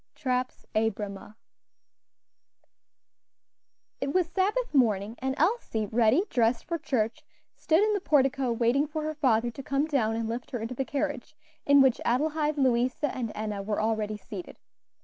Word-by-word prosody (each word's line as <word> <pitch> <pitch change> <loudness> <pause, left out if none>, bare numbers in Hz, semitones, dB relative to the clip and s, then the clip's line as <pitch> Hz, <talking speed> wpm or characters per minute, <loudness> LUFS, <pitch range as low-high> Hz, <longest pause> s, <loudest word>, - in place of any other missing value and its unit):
TRAP's 255 -2 -2
Abramuh. 210 -2 -2 2.6
It 280 - -2
was 365 +2 +2
Sabbath 390 +8 -1
morning, 220 -5 +2
and 265 +1 -2
Elsie, 325 - 0
ready 230 - +3
dressed 230 -1 +1
for 335 0 -3
church, 230 -7 -1 0.3
stood 330 +5 +2
in 430 0 +2
the 405 - -1
portico 270 -5 +2
waiting 240 +5 +2
for 310 +1 -4
her 310 0 -2
father 240 -6 +1
to 275 - -8
come 275 +2 0
down 245 -8 0
and 225 0 -2
lift 235 +2 -5
her 245 - -4
into 225 +3 -4
the 265 +2 -2
carriage, 290 -1 -3 0.3
in 285 0 +7
which 260 -3 +2
Adelaide, 300 +4 0
Louisa, 255 +2 +1
and 235 -4 -3
Enna 210 -1 -3
were 210 +1 -2
already 215 -1 -1
seated. 355 - -9
255 Hz, 150 wpm, -28 LUFS, 225-300 Hz, 2.6 s, in